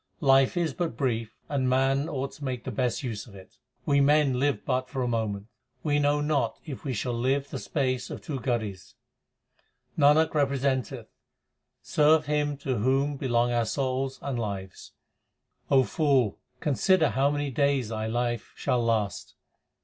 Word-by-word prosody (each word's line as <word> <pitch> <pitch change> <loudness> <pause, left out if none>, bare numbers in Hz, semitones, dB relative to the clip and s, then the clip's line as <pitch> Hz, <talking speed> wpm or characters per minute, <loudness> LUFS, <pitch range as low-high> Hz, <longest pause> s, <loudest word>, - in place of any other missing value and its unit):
Life 135 +2 +4
is 165 -5 0
but 160 -6 -3
brief, 115 -4 -1
and 135 -3 0
man 135 +3 +2
ought 135 -1 -3
to 145 - -12
make 130 -3 -3
the - - -4
best 125 -2 -1
use 115 -4 -4
of 100 - -14
it: 95 -1 -15 0.3
We 140 0 +3
men 140 -2 +3
live 145 +1 0
but 130 -1 -1
for 130 -3 -2
a - - -1
moment; 110 -4 -2 0.4
we 145 -2 +2
know 145 0 +2
not 145 -6 0
if 145 -6 -7
we 140 - -2
shall 125 +1 -2
live 135 +4 0
the - - -4
space 130 -4 -1
of - - -6
two 140 -4 -5
gharis. 110 -7 -3 1.0
Nanak 155 +2 +4
representeth, 135 -4 0 0.8
serve 155 +1 +4
Him 145 -1 0
to 130 -4 -2
whom 135 +5 +1
belong 120 -3 +1
our 120 -1 +2
.souls 130 +2 -2
and 135 -4 -2
lives. 100 -4 -6 0.8
O 135 -2 +5
fool, 135 - +1 0.2
consider 160 +4 +3
how 135 +2 +2
many 145 -1 -2
days 140 -3 +1
thy 110 -1 -3
life 120 0 -2
shall 125 -1 0
last. 110 -4 -1
135 Hz, 165 wpm, -27 LUFS, 120-145 Hz, 1.0 s, O